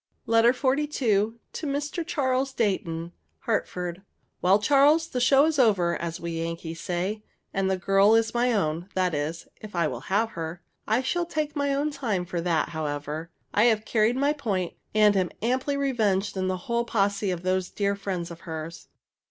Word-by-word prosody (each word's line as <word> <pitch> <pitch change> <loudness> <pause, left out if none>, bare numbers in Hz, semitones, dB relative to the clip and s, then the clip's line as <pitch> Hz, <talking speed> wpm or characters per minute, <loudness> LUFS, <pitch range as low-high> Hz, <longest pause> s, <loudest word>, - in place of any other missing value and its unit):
LETTER 230 +1 +5
XLII. 270 +3 +1
TO 225 -6 +1 0.2
MR. 295 +3 -3
CHARLES 265 -5 0
DEIGHTON. 170 -7 -1 0.3
HARTFORD. 180 -7 -2 0.4
Well, 185 +2 +5
Charles, 290 +8 +4
the 250 - -2
show 275 +3 +5
is 315 -2 0
over, 195 -8 +3
as 170 0 -4
we 165 -1 -4
Yankees 165 0 -5
say, 185 +5 -2 0.3
and 195 -1 0
the 190 - +1
girl 195 +3 +4
is 225 0 +2
my 245 +1 +2
own; 175 -4 -1
that 185 -2 +1
is, 150 +3 -3
if 210 -3 -9
I 170 -1 +2
will 125 -5 -4
have 220 +4 +1
her. 165 +1 -6 0.2
I 230 +4 +2
shall 345 +6 -1
take 310 -2 -2
my 285 -1 0
own 285 +2 0
time 220 -11 -2
for 175 -1 -3
that, 165 -2 +1
however. 150 +1 -4 0.2
I 210 - +4
have 220 -2 +3
carried 220 +1 +2
my 285 +2 +2
point, 200 - -2 0.2
and 210 -1 +5
am 185 -2 +1
amply 260 +4 0
revenged 215 -9 0
on 185 -1 -1
the 185 0 -1
whole 235 0 0
posse 200 -3 0
of 180 -1 -3
those 185 0 0
dear 200 -1 0
friends 185 -4 -4
of 165 - -9
hers. 165 -1 -7
205 Hz, 180 wpm, -26 LUFS, 175-255 Hz, 0.4 s, LETTER